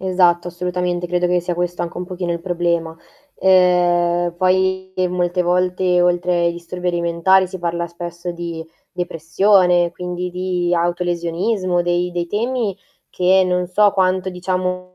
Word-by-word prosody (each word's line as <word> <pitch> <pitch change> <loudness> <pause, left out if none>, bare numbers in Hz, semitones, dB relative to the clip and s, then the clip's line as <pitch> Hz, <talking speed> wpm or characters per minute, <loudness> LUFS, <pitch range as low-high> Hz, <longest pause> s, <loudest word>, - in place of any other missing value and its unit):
Esatto, 180 -2 +2
assolutamente 180 0 -2
credo 180 0 0
che 180 0 +2
sia 175 0 -3
questo 175 0 -2
anche 170 - -6
un 180 - -4
pochino 180 -1 -4
il 170 - -4
problema. 170 -2 -1 0.4
Ehm, 175 -2 +3
poi 190 +1 +1 0.2
molte 180 0 0
volte, 180 0 +1
oltre 180 0 +1
ai 170 0 +1
disturbi 175 +1 -5
alimentari, 175 +2 +2
si 185 0 -8
parla 170 0 -2
spesso 170 +1 -7
di 170 -1 -6 0.3
depressione, 175 +1 +2
quindi 180 0 -5
di 180 -1 -1
autolesionismo, 175 +2 -1
dei 175 +1 0
dei 175 -1 -3
temi 220 +1 -2 0.3
che 185 +1 +3
non 180 0 0
so 205 +2 +3
quanto, 185 -1 +1
diciamo, 180 0 -3
180 Hz, 140 wpm, -19 LUFS, 175-185 Hz, 0.4 s, Ehm